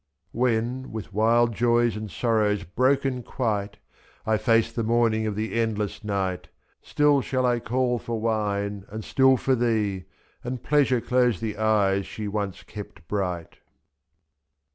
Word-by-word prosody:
89 120 - -5
When, 125 +2 0
with 110 -2 -7
wild 115 +3 +3
joys 120 0 +2
and 110 0 -5
sorrows 105 -3 +1
broken 130 +5 +1
quite, 105 -4 -2 0.5
I 110 - +2
face 115 +1 +2
the 115 - -3
morning 115 -1 +2
of 105 - -2
the 110 +1 -3
endless 110 -2 -1
night, 95 -3 -2 0.4
2if. - - -23
Still 145 -1 +3
shall 130 0 -1
I 120 -1 +2
call 125 +1 0
for 115 -1 -4
wine, 105 -3 -1
and 110 +1 -6
still 130 -1 +4
for 130 - +1
thee. 110 -6 0 0.4
And 125 0 -5
Pleasure 140 -5 +2
close 125 -2 +2
the 110 -2 -3
eyes 100 -3 +2
she 105 -1 -5
once 100 -2 -3
kept 100 -6 -10
bright. 90 -4 -3
110 Hz, 150 wpm, -25 LUFS, 105-120 Hz, 0.5 s, still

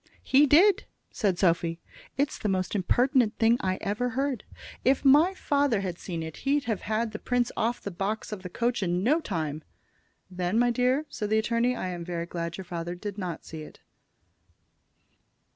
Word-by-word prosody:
"He 285 +2 +5
did," 355 +8 +5 0.3
said 195 -4 0
Sophy. 170 -2 +1 0.4
"It's 280 +1 0
the 210 - -1
most 185 -1 -1
impertinent 240 +4 +2
thing 230 +1 +4
I 185 -1 0
ever 210 +5 -1
heard. 275 -4 -1 0.4
If 265 +2 +2
my 305 +8 +6
father 280 - +1
had 180 -3 -4
seen 170 -3 -4
it 160 -1 -7
he'd 280 +1 +1
have 220 -7 -2
had 220 +2 -1
the 210 - -6
prince 245 -1 0
off 235 +2 0
the 200 - -4
box 200 +5 -3
of 210 -3 -5
the 180 - -7
coach 235 +4 -1
in 180 0 0
no 295 +9 +3
time." 155 - -3 0.6
"Then, 180 +2 -2
my 240 +1 +4
dear," 255 +5 +1
said 210 -6 -4
the 220 - +3
attorney, 235 +2 +1
"I 185 - -3
am 175 -1 -5
very 170 -1 -3
glad 170 -1 -4
that - - -7
your 190 - -7
father 170 0 -4
did 205 +2 -6
not 175 -4 -5
see 160 -1 -8
it." 155 - -12
210 Hz, 190 wpm, -27 LUFS, 180-250 Hz, 0.6 s, my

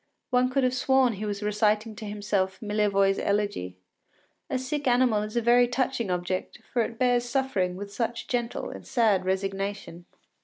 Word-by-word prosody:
One 250 0 +3
could 270 +1 +1
have 255 0 +2
sworn 260 -1 +3
he 210 +1 -4
was 205 0 -3
reciting 210 +1 +1
to 220 - -7
himself 205 -2 -1
Millevoye’s 205 -2 +1
elegy. 200 - -1 0.7
A - - 0
sick 275 +2 -3
animal 245 -3 +3
is 215 +2 -4
a 235 - +1
very 240 +1 +5
touching 245 -3 -1
object, 180 +1 -2 0.2
for 240 - +3
it 230 0 -3
bears 245 -1 +2
suffering 240 -8 0
with 200 +1 -7
such 235 +1 -3
gentle 240 -1 -2
and - - -10
sad 215 -7 +2
resignation. 195 -2 -3
215 Hz, 165 wpm, -27 LUFS, 195-245 Hz, 0.7 s, very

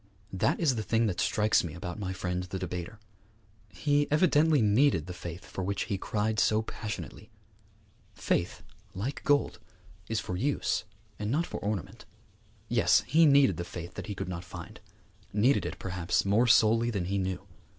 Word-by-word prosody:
That 115 - +1
is 155 -6 +3
the - - -1
thing 115 +1 +1
that 95 -5 -1
strikes 105 0 +2
me 85 -2 -6
about 90 +3 -6
my 95 -2 -3
friend 90 -1 -3
the 90 +1 -5
debater. 90 +2 -5 0.7
He 145 +10 +1
evidently 155 -1 +4
needed 110 - +3
the 90 - -6
faith 85 0 -8
for 95 - -5
which 100 +1 -1
he 100 -4 -3
cried 105 +1 -1
so 110 +1 +3
passionately. 105 - -7 0.9
Faith, - - -1 0.3
like 120 +9 -4
gold, 145 -1 +2 0.5
is 110 -1 0
for 90 - -4
use 135 +10 0 0.3
and 105 0 -2
not 155 +8 +1
for - - -6
ornament. 105 -3 -4 0.6
Yes, - - +3
he 160 +1 +5
needed 140 -1 +5
the 85 - -3
faith 85 0 -8
that - - -7
he 105 - -4
could - - -4
not 90 -1 -5
find; 90 - -10 0.5
needed 115 +7 +3
it, - - -6
perhaps, 90 -1 -1
more 105 +5 +3
sorely 115 0 +4
than 100 -6 -2
he 100 +2 -1
knew. 95 0 -3
105 Hz, 170 wpm, -29 LUFS, 90-120 Hz, 0.9 s, he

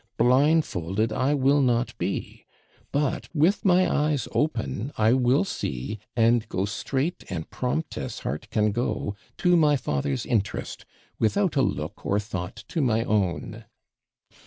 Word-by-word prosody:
Blindfolded 115 - +2
I 140 +3 +1
will 140 +1 +3
not 120 -2 +1
be - - -4 0.4
but, 145 -1 -1
with 165 +7 +3
my 185 -1 +4
eyes 150 -5 0
open, 135 -4 -1
I 110 +2 +4
will 130 +3 +3
see, 105 - -4 0.2
and 115 -1 +3
go 95 +2 -1
straight 135 - -2
and 85 -5 -4
prompt 145 +5 -2
as - - -5
heart 75 +10 -4
can 105 -1 +2
go, 105 -2 -2 0.2
to 180 0 +3
my 150 -3 +4
father's 70 - -2
interest, 100 -6 -2 0.3
without 180 - +1
a 135 - +4
look 90 - -2
or 100 - +1
thought 95 -2 -5
to 165 - -1
my 115 -4 +2
own.' 100 -7 -1
120 Hz, 140 wpm, -26 LUFS, 105-145 Hz, 0.4 s, my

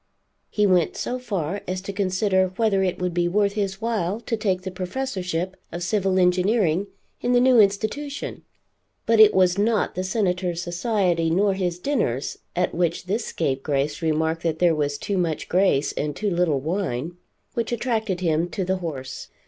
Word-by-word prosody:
He 210 - +1
went 180 -4 +2
so 255 - -3
far 200 -6 -3
as 185 +1 -2
to 195 +1 -6
consider 190 0 +1
whether 215 -4 +2
it 185 -1 0
would 180 -1 -2
be 175 0 +1
worth 200 +2 +2
his 200 -2 -2
while 220 -3 -1
to 235 - -2
take 190 -4 -1
the 190 - -4
professorship 185 -3 -3 0.2
of 175 - -4
civil 190 0 +1
engineering 185 0 +2 0.3
in 245 - +1
the 245 - +5
new 250 -1 +5
institution. 220 +8 0 0.6
But 230 -1 +3
it 215 -1 +9
was 185 0 +3
not 220 +1 +1
the 185 - -3
Senator's 185 -3 -1
society 175 -2 0
nor 195 +4 +2
his 180 -2 -2
dinners 180 - -1 0.2
at 180 0 0
which 170 0 -1
this 215 +5 -1
scapegrace 140 0 -1
remarked 160 0 0
that 160 -2 -1
there 175 0 +4
was 145 -2 -1
too 195 +5 -2
much 165 -3 -1
grace 180 -6 +2
and 150 -1 -3
too 210 -2 -1
little 170 -5 +1
wine 165 -1 -3 0.4
which 230 0 -2
attracted 220 -6 -1
him 165 0 +1
to 185 +3 -3
the 190 +1 0
house. 135 -7 -6
185 Hz, 175 wpm, -24 LUFS, 170-205 Hz, 0.6 s, it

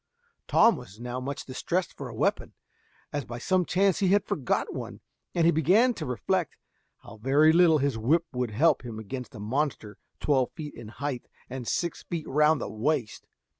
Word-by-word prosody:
Tom - - +5
was 100 +3 -12
now 125 +1 -4
much 140 +2 -5
distressed 175 +7 -2
for - - -7
a - - -9
weapon, - - -1 0.6
as 145 -1 -1
by 120 0 -7
some 185 +8 +1
chance 195 +1 +2
he 195 - +2
had 200 +2 +3
forgot 155 - -1
one, - - -6 0.4
and 170 -2 +3
he 170 - +6
began 200 +10 +4
to 160 - -6
reflect 170 +7 -1 0.5
how 110 - -12
very 140 +7 +4
little 170 -2 +6
his 140 -5 0
whip 160 +9 +2
would 125 -1 -1
help 135 +6 +3
him 115 -3 -7
against 125 +4 -7
a - - -8
monster 115 -1 -2 0.2
twelve 135 -4 +2
feet 150 -2 -7
in 110 - -10
height 130 +2 -5 0.2
and 130 -2 -5
six 170 -2 -1
feet 170 -3 -5
round 150 +2 +3
the - - -4
waist. 120 +1 -2
145 Hz, 185 wpm, -27 LUFS, 125-170 Hz, 0.6 s, he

